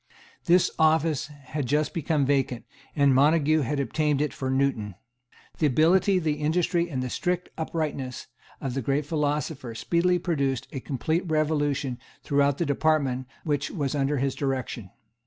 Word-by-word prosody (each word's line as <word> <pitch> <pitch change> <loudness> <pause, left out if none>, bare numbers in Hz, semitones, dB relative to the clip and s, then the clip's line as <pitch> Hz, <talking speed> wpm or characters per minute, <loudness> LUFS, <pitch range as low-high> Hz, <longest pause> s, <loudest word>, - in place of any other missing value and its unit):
This 175 0 +4
office 155 -1 +3
had 145 -1 -6
just 150 +3 +1
become 155 -3 0
vacant, 135 -3 0 0.3
and 140 -2 +4
Montague 155 +3 +4
had 140 +2 -1
obtained 150 +1 0
it 150 -5 0
for 130 +4 -4
Newton. 130 -7 0 0.6
The 155 - +4
ability, 175 +8 +4
the 155 -4 0
industry 170 +2 +1
and 130 -5 -2
the - - -2
strict 180 0 -1
uprightness 155 -6 -3 0.3
of 135 - -3
the 135 - -2
great 140 +4 0
philosopher 150 -4 -2
speedily 175 +8 +1
produced 140 -7 -1
a 135 - -4
complete 160 +7 -2
revolution 145 -4 0 0.2
throughout 140 -1 +2
the 170 - 0
department 140 -3 +1 0.2
which 145 -2 -1
was 145 -7 -2
under 145 0 0
his 135 0 0
direction. 130 -7 -3
145 Hz, 150 wpm, -26 LUFS, 135-160 Hz, 0.6 s, This